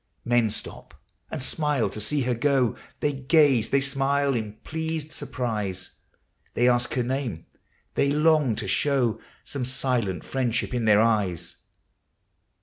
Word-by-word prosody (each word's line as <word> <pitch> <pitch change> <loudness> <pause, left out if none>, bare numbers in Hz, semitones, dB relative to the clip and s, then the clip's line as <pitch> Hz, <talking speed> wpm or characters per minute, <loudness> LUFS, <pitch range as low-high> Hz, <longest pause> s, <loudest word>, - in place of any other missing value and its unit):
Men 120 -2 +3
stop - - -6 0.3
and 150 -5 -4
smile 145 -5 +1
to 105 - -6
see 140 +7 0
her 125 -1 +1
go; 130 -1 +2 0.3
They 145 - +1
gaze, 135 -3 +3
they 140 - +3
smile 140 0 +1
in 110 -4 -3
pleased 160 -1 -4
surprise; 105 -11 -3 0.6
They 120 - +3
ask 120 -1 +2
her 125 - +1
name; 125 - -3 0.5
they 140 - +2
long 150 -5 +3
to - - -4
show 125 -6 +1 0.2
Some 140 -3 -4
silent 120 -7 -1
friendship 125 -2 -1
in 120 -2 0
their 105 -1 +6
eyes. 100 -7 0
125 Hz, 140 wpm, -25 LUFS, 110-140 Hz, 0.6 s, their